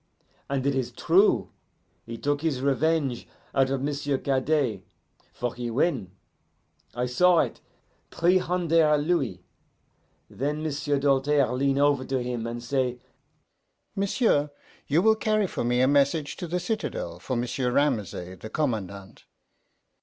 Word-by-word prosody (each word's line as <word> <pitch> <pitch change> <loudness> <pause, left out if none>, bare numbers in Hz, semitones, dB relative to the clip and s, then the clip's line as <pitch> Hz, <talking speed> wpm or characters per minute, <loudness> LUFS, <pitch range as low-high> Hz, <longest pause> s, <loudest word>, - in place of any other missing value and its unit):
And 135 -1 -1
it 140 - +2
is 130 -2 -2
true: 165 - +3 0.6
he 115 0 -6
took 145 +3 -1
his 155 -5 -1
revenge 140 -2 0 0.3
out 135 -1 +3
of 135 0 -2
M'sieu' 145 -1 -1
Cadet, 135 -5 0 0.5
for 125 -1 -3
he 120 -1 -4
win 120 - 0 0.9
I 125 +1 0
saw 175 +8 +4
it - - 0 0.5
three 180 +2 +3
hunder' 165 -4 +2
louis. 145 - -1 0.8
Then 150 +4 -3
M'sieu' 145 -1 -1
Doltaire 140 -1 +2
lean 135 +1 +1
over 140 -2 +3
to 135 - -1
him 120 -2 -3
and 120 0 -5
say, 125 -1 -1 1.0
'M'sieu', 195 - +1 0.4
you 160 +5 +2
will 220 0 +5
carry 215 -1 +1
for 185 - -3
me 125 +1 +1
a 130 - +4
message 145 +2 +2
to 180 - -5
the 180 +2 -1
citadel 175 - -4
for 130 +8 -3
M'sieu' 125 +2 -1
Ramesay, 105 - -1
the 110 - -8
commandant. 100 -9 -4
140 Hz, 140 wpm, -26 LUFS, 125-155 Hz, 1.0 s, will